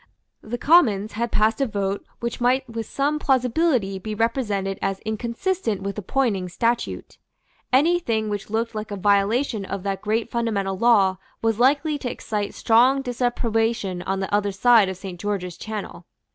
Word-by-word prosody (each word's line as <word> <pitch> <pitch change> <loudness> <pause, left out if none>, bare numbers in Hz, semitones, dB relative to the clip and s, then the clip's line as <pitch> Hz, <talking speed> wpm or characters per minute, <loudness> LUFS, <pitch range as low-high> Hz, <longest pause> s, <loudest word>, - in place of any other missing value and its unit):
The 235 +3 -5
Commons 235 - +4
had 235 +2 -2
passed 220 +3 +2
a 270 - +2
vote 200 -2 -2 0.2
which 235 +1 -4
might 255 +2 +2
with 230 -2 -5
some 290 +2 0
plausibility 255 - +1
be 215 +2 -5
represented 210 -4 -1
as 195 -1 -1
inconsistent 230 - -2
with 200 0 -3
the 210 - -4
Poynings 195 -6 -1
statute. 235 +4 -2 0.5
Any 320 +7 +4
thing 220 -9 -1
which 205 -1 -4
looked 225 +2 -1
like 215 0 -5
a 205 - -4
violation 205 +4 +1
of 195 -1 -5
that 195 -1 -2
great 220 +2 -1
fundamental 210 -5 -1
law 195 -3 +4 0.3
was 225 -1 +1
likely 290 +4 +2
to 255 - -3
excite 210 -3 -4
strong 255 +4 +4
disapprobation 230 -6 -1
on 195 +1 -2
the 190 - -4
other 205 0 +2
side 215 0 +5
of 190 - -5
Saint 185 -2 -8
George's 185 -3 -3
Channel. 205 -5 -6
220 Hz, 165 wpm, -23 LUFS, 200-245 Hz, 0.5 s, side